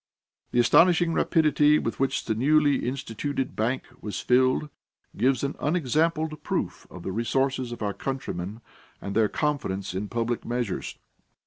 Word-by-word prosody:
The 120 Hz, -, +1 dB
astonishing 165 Hz, +6 st, +5 dB
rapidity 150 Hz, -3 st, +4 dB
with 115 Hz, -, -3 dB
which 135 Hz, 0 st, 0 dB
the 110 Hz, -, 0 dB
newly 145 Hz, +3 st, +3 dB
instituted 135 Hz, +1 st, -3 dB
bank 120 Hz, +5 st, 0 dB, 0.2 s
was 105 Hz, -, -4 dB
filled, 130 Hz, +4 st, +2 dB, 0.5 s
gives 130 Hz, +4 st, +2 dB
an 140 Hz, +1 st, -1 dB
unexampled 155 Hz, 0 st, 0 dB
proof -, -, -3 dB
of 90 Hz, -, -10 dB
the 95 Hz, -, -3 dB
resources 130 Hz, +4 st, 0 dB
of 120 Hz, -, -5 dB
our 100 Hz, -1 st, -1 dB
countrymen 110 Hz, -6 st, -5 dB, 0.4 s
and 100 Hz, -, -6 dB
their 110 Hz, -1 st, +3 dB
confidence 100 Hz, -, -2 dB
in 100 Hz, +3 st, -3 dB
public 115 Hz, +2 st, -2 dB
measures. 120 Hz, -5 st, -3 dB
130 Hz, 140 wpm, -26 LUFS, 115-150 Hz, 0.5 s, astonishing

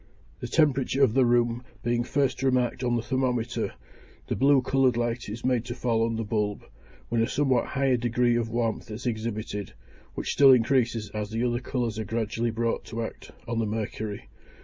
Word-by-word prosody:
The -, -, -5 dB
temperature 140 Hz, -3 st, +2 dB
of 110 Hz, -, +4 dB
the 130 Hz, -1 st, +4 dB
room 120 Hz, 0 st, +2 dB, 0.2 s
being 120 Hz, 0 st, +1 dB
first 135 Hz, 0 st, 0 dB
remarked 125 Hz, -2 st, +1 dB
on 120 Hz, -1 st, +1 dB
the 115 Hz, -, -1 dB
thermometer, 125 Hz, -3 st, -1 dB, 0.5 s
the -, -, -2 dB
blue 135 Hz, 0 st, +4 dB
coloured 130 Hz, -2 st, +2 dB
light 120 Hz, -1 st, -2 dB
is 115 Hz, +4 st, -6 dB
made 125 Hz, -3 st, +2 dB
to 120 Hz, -1 st, -5 dB
fall 115 Hz, -3 st, +1 dB
on 115 Hz, 0 st, 0 dB
the 115 Hz, -, -2 dB
bulb, 105 Hz, -1 st, -2 dB, 0.4 s
when 115 Hz, -1 st, +1 dB
a 115 Hz, -, +2 dB
somewhat 135 Hz, -4 st, +1 dB
higher 135 Hz, -2 st, +1 dB
degree 120 Hz, 0 st, +1 dB
of 115 Hz, -1 st, 0 dB
warmth 115 Hz, 0 st, -2 dB
is 110 Hz, +3 st, -7 dB
exhibited, 110 Hz, -3 st, -3 dB, 0.4 s
which -, -, -2 dB
still 135 Hz, -2 st, +7 dB
increases 115 Hz, -3 st, +1 dB
as 105 Hz, -1 st, -4 dB
the 115 Hz, +2 st, -2 dB
other 120 Hz, -1 st, +1 dB
colours 120 Hz, -3 st, -2 dB
are -, -, -1 dB
gradually 115 Hz, +1 st, -1 dB
brought 115 Hz, +1 st, -1 dB
to 115 Hz, +1 st, -4 dB
act -, -, -8 dB, 0.2 s
on 115 Hz, -1 st, -1 dB
the 110 Hz, -, 0 dB
mercury. 105 Hz, -1 st, -4 dB
120 Hz, 190 wpm, -27 LUFS, 115-125 Hz, 0.5 s, still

